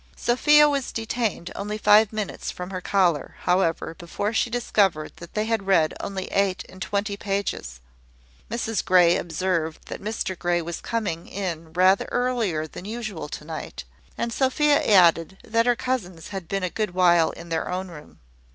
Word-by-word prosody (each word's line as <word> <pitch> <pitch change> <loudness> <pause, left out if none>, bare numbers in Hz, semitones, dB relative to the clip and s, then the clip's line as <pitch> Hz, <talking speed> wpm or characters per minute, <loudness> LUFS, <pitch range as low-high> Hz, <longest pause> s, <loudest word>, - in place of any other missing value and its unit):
Sophia 295 +5 +5
was 280 -3 -1
detained 225 -5 -2
only 210 +1 -4
five 215 0 +5
minutes 215 -2 -4
from 180 +1 -6
her 185 -1 -4
collar, 175 -7 +1
however, 180 -3 +1
before 200 +5 -3
she 230 - +1
discovered 200 -9 0
that 170 - -12
they 215 0 0
had 220 -3 -1
read 165 -5 +3
only 190 -1 -4
eight 195 -1 0
and 185 - -14
twenty 200 +2 -1
pages. 195 - -3 0.7
Mrs 225 -2 -2
Grey 175 -2 +5
observed 165 -1 -1
that - - -6
Mr 210 -2 -3
Grey 175 0 0
was 170 0 -5
coming 205 -8 -3
in 170 -5 -5
rather 185 +2 +3
earlier 230 -11 0
than 165 +3 -10
usual 215 -8 -5
to 150 - -7
night; 160 0 -6 0.3
and 235 0 -2
Sophia 285 +4 +3
added, 180 -2 +4
that 230 +1 +1
her 245 - +4
cousins 190 -11 -3
had 190 -4 -6
been 195 +1 -2
a 180 - -1
good 210 -5 -3
while 175 -3 +5
in 170 0 -10
their 165 -1 -2
own 185 +1 -3
room. 150 -3 -13
190 Hz, 170 wpm, -24 LUFS, 170-220 Hz, 0.7 s, Sophia